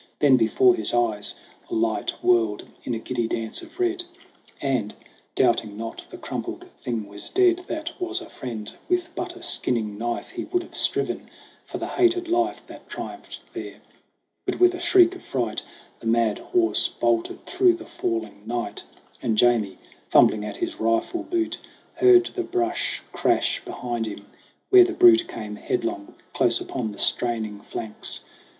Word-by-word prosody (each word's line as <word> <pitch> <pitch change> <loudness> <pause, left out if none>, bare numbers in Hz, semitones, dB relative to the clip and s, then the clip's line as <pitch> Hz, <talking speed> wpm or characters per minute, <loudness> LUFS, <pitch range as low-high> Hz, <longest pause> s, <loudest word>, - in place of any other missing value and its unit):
Then 140 -3 +6
before 130 - +4
his 355 - 0
eyes 110 -4 0 0.3
The - - -2
light 110 0 0
whirled 115 -3 +2 0.2
in 120 - -2
a - - -2
giddy 120 0 -2
dance 115 -1 -2
of 335 0 -14
red; 360 0 +1 0.6
And, 130 -7 -1 0.4
doubting 105 -2 +2
not 115 +1 -6
the - - -9
crumpled - - -5 0.2
thing 115 -4 -3
was 100 0 -7
dead 365 -1 +3
That 315 +1 -3
was 360 +1 -1
a 345 - -10
friend, 115 - -6 0.2
with 355 -2 0
but 360 -1 -4
a 360 - -12
skinning 110 - 0
knife 120 +1 -3
He - - -5
would 360 -1 -1
have - - -14
striven - - +1 0.4
for - - -5
the - - -3
hated 355 -1 +2
life 345 0 0
That - - -13
triumphed - - -7
there: - - -6 0.7
but - - -2
with 360 0 +6
a 360 - -5
shriek 355 0 +5
of 360 - -10
fright 120 -5 -2 0.4
The 115 - -7
mad 115 -2 +2
horse 355 -1 +2
bolted 350 +1 -1
through 365 0 +4
the 345 0 -8
falling 110 -3 -3
night, 120 0 -3 0.4
And 110 - 0
Jamie, 110 -5 +3 0.3
fumbling 105 -1 +5
at 105 -1 -5
his - - -3
rifle 115 - +1
boot, 340 0 -1 0.3
Heard 370 -1 +6
the 370 - -1
brush 355 -1 -1
crash - - +1
behind 120 -2 -3
him 100 -1 -7 0.5
where 380 -1 +10
the 360 0 -1
brute 345 -1 +6
Came 105 -1 -6
headlong, 345 - -3 0.2
close - - +3
upon 125 - -4
the 100 - -11
straining 110 -4 +1
flanks. 110 0 -3
130 Hz, 165 wpm, -24 LUFS, -, 0.7 s, where